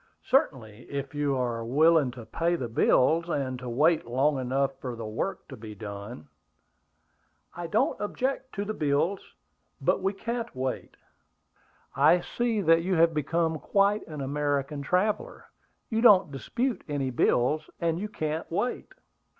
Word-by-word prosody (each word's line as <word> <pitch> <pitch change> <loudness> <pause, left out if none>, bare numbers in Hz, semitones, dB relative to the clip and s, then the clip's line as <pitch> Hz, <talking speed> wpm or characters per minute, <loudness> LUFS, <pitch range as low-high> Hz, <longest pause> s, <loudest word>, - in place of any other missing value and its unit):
"Certainly, 120 - 0
if 140 0 -4
you 145 -2 0
are 120 -2 -2
willing 150 +4 +4
to 120 -3 -10
pay 170 +9 0
the 130 -8 -3
bills 160 +8 +3
and 130 -5 -2
to 125 -1 -6
wait 155 +7 +3
long 135 +4 +1
enough 135 +2 0
for 125 -2 -4
the 115 -1 -6
work 125 - -4
to 135 - -8
be 110 -2 -10
done." 100 -4 -8 1.3
"I 175 0 -5
don't 165 - 0
object 260 +5 -2
to 200 0 -2
the 215 - -3
bills, 155 +4 0 0.6
but - - +1
we 195 +1 0
can't 230 - -4
wait." 130 0 -4 1.0
"I 155 +6 +5
see 230 +2 -1
that 165 -2 +4
you 185 +2 0
have 165 0 +4
become 160 +1 0
quite 200 +7 +1
an 150 -3 -6
American 145 +1 -1
traveller; 205 - -1 0.5
you 225 0 +1
don't 195 -9 +6
dispute 235 - -2
any 140 -3 -1
bills, 125 +5 +1
and 165 0 0
you 210 +2 -4
can't 155 -4 -3
wait." 245 +9 -2
150 Hz, 150 wpm, -27 LUFS, 130-185 Hz, 1.3 s, don't